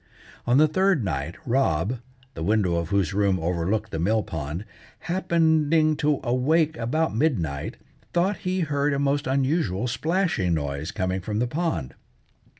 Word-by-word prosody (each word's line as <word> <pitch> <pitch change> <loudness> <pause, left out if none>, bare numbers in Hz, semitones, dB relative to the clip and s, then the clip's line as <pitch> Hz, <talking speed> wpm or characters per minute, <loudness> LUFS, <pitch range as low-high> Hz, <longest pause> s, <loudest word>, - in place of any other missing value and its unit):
On 120 +2 +4
the 155 +2 +6
third 185 - +2
night 80 -1 -3
Rob, 115 - +1 0.3
the - - -7
window 95 -1 +2
of 85 -1 -2
whose 100 -5 +1
room 100 -2 +2
overlooked 90 +5 -1
the 80 - -3
mill 105 +6 +2
pond, 80 +3 -5 0.4
happening 160 -3 +2
to 150 -2 +1
awake 150 +6 +2
about 150 +5 0
midnight, 90 - -1 0.3
thought 185 +3 +1
he 185 +2 -2
heard 145 -2 0
a - - 0
most 140 0 0
unusual 130 - 0
splashing 160 - 0
noise 70 +1 -3
coming 95 0 -2
from 105 +3 -3
the 120 - +1
pond. 120 - -2
120 Hz, 150 wpm, -25 LUFS, -, 0.4 s, the